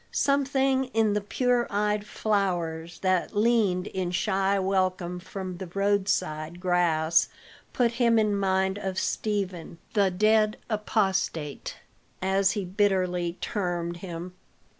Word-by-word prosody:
Something 270 -1 +2
in 220 -2 +3
the 210 - 0
pure 245 +3 +1
eyed 210 0 0
flowers 175 -7 -1
that 185 +2 0
leaned 210 -5 +2
in 185 -3 -3
shy 190 +2 +1
welcome 185 -2 0
from 185 0 -6
the 190 0 -6
roadside 190 -5 0
grass 170 -3 +2 0.4
put 240 -2 +2
him 235 -1 +3
in 210 -2 +2
mind 190 0 +1
of 190 -2 -4
Stephen, 190 -7 -2 0.2
the 200 -3 +3
dead 215 +3 +3
apostate, 195 -8 -1 0.4
as 190 +1 +2
he 205 -4 -3
bitterly 185 -2 0
termed 175 -4 -2
him. 175 0 -7
190 Hz, 120 wpm, -27 LUFS, 180-210 Hz, 0.4 s, in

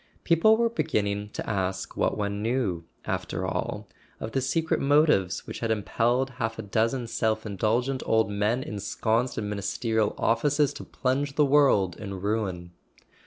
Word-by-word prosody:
People 195 +7 +5
were 235 0 +3
beginning 105 - -1
to - - -5
ask 95 -2 -2
what - - 0
one 100 0 -2
knew, 110 -8 -1 0.2
after - - -3
all, - - -3 0.3
of 110 - -5
the 135 - 0
secret 160 +5 0
motives 140 - +3
which - - -7
had 115 - -2
impelled 120 +5 +1
half 115 0 -1
a 115 - -5
dozen 115 +5 0
self 110 -1 -1
indulgent 115 +6 0
old 110 -1 +2
men 105 +5 0
ensconced 110 +3 -1
in 105 - -2
Ministerial 105 +2 -1
offices 145 +5 +2
to - - -8
plunge 140 +2 -1
the 150 - +4
world 135 - +4
in 100 -3 -6
ruin. 95 -4 -2
110 Hz, 155 wpm, -27 LUFS, 100-135 Hz, 0.3 s, People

